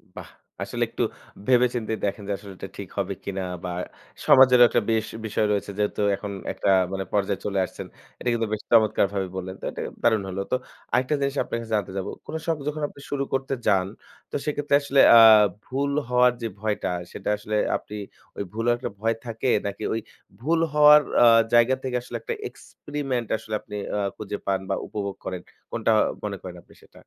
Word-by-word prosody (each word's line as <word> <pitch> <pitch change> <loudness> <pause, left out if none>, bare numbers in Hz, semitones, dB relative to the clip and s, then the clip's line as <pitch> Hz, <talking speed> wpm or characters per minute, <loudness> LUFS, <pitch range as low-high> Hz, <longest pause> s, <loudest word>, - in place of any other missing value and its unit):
বাহ! - - -9 0.3
আসলে - - -2
একটু - - -2 0.4
ভেবে-চিন্তেই 120 -3 +2
দেখেন 100 +1 -3
যে - - -2
আসলে 100 0 -11
এটা 95 - -7
ঠিক 100 -3 -7
হবে 100 -1 -1
কিনা 95 -1 -3 0.2
বা 90 - -3 0.6
সমাজেরও 125 -2 +8
একটা - - +2
বেশ 110 -1 +1 0.2
বিষয় 110 0 0
রয়েছে, 100 0 -1
যেহেতু 105 0 0
এখন 100 +1 -6 0.2
একটা - - -1 0.2
মানে 95 0 -2
পর্যায়ে 100 -2 0
চলে 100 -1 0
আসছেন - - -9 0.3
এটা 125 - -1
কিন্তু 115 -1 0
বেশ 105 - -2
চমৎকারভাবেই 100 -4 +3
বললেন 95 0 -5
তো - - -20
এটা - - -6 0.2
দারুণ 110 -3 +3
হলো 95 +1 -3
তো - - +4 0.4
আরেকটা 130 +4 +2
জিনিস 140 0 0
আপনার - - -4
কাছে 115 - -10
জানতে 100 -2 -2
যাব। 95 - -3 0.2
কোনো 160 - -4
শখ 165 -2 0
যখন 150 0 -3
আপনি 140 - -16
শুরু 140 -1 -1
করতে 135 +1 -1
যান, 95 -2 +3 0.4
তো - - -5
সেক্ষেত্রে 145 -1 +1
আসলে 140 -1 +3 0.2
আ - - +10 0.5
ভুল 140 +2 -1 0.2
হওয়ার 125 0 +5
যে 115 - -1
ভয়টা, 105 -3 -1 0.2
সেটা - - -5
আসলে 105 +1 -4 0.2
আপনি 105 - -10 0.4
ওই - - -2
ভুলের 115 +2 +1
একটা 120 - -4
ভয় 115 +1 +1
থাকে 115 +2 -2 0.2
নাকি 100 - -5
ওই 115 - 0 0.4
ভুল 165 +5 +1
হওয়ার 150 0 +8 0.2
আ - - +8 0.3
জায়গা 120 +2 +5
থেকে 130 -1 -2
আসলে 125 - -9
একটা 470 - -3 0.2
এক্সপেরিমেন্ট 135 -6 -5
আসলে 110 0 -9
আপনি - - -9 0.2
আ - - 0 0.2
খুঁজে 105 -1 -5
পান 95 -1 +1
বা 95 - +1
উপভোগ 100 -2 -4
করেন? 90 -1 -4 0.3
কোনটা 115 -1 +1 0.3
মনে 100 -2 -3
করেন 90 -1 -8
আপনি - - -21
সেটা? - - -23
110 Hz, 190 wpm, -25 LUFS, 100-130 Hz, 0.6 s, আ